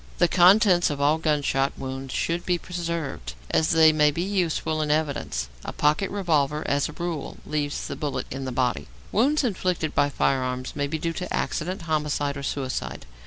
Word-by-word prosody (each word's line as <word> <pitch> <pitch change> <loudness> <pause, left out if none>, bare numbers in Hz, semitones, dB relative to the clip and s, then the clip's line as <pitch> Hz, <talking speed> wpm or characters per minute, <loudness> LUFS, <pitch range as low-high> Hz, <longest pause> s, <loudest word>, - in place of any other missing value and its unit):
The 175 - +4
contents 185 +1 +5
of 145 -2 -3
all 150 +3 +3
gunshot 145 -3 +1
wounds 135 0 -5
should 170 +5 -1
be 180 -1 +1
preserved, 165 - -4 0.2
as 160 - +2
they 160 -1 +6
may 150 -1 +4
be 165 +4 -2
useful 170 -5 0
in 150 - -1
evidence. 145 - -1 0.2
A - - -5
pocket 150 +6 +1
revolver, 155 -7 0
as 140 0 +1
a - - -8
rule, 170 -3 -4
leaves 145 -1 -2
the - - -4
bullet 145 -2 -3
in 135 +1 -4
the 130 - -3
body. 125 - -1 0.2
Wounds 280 +8 +3
inflicted 185 - -1
by 145 0 +3
firearms 130 -2 -1
may 145 0 -1
be 160 +3 -2
due 165 +1 -2
to 180 +2 -5
accident, 175 +2 -2
homicide, 150 -3 -1
or 140 - -5
suicide. 135 -2 -3
155 Hz, 180 wpm, -25 LUFS, 140-175 Hz, 0.2 s, they